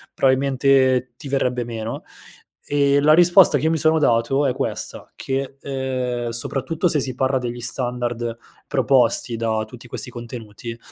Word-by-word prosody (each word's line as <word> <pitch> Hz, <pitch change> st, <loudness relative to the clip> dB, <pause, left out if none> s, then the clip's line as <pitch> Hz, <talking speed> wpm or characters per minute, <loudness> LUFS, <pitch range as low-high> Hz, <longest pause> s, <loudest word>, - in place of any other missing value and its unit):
probabilmente 130 Hz, -1 st, +2 dB
ti 140 Hz, -, -9 dB
verrebbe 125 Hz, -2 st, 0 dB
meno; 115 Hz, -1 st, -5 dB, 0.7 s
ehm, 140 Hz, -1 st, +3 dB
la 155 Hz, +1 st, +6 dB
risposta 175 Hz, -1 st, +6 dB
che 155 Hz, +4 st, +1 dB
mi 165 Hz, -, +1 dB
sono 160 Hz, +1 st, +3 dB
dato 135 Hz, +2 st, +2 dB
è 130 Hz, -, +1 dB
questa: 130 Hz, -, -4 dB
che, 135 Hz, 0 st, -4 dB
uhm, 130 Hz, -3 st, -3 dB
soprattutto 135 Hz, +8 st, -2 dB
se 155 Hz, -3 st, +1 dB
si 130 Hz, -1 st, -4 dB
parla 130 Hz, +1 st, +1 dB
degli 120 Hz, -1 st, -5 dB
standard 120 Hz, -1 st, -2 dB, 0.3 s
proposti 130 Hz, -3 st, +2 dB
da 110 Hz, -1 st, -1 dB
tutti 120 Hz, +2 st, -13 dB
questi 125 Hz, -, -3 dB
contenuti, 115 Hz, -1 st, -8 dB
130 Hz, 145 wpm, -21 LUFS, 120-140 Hz, 0.7 s, la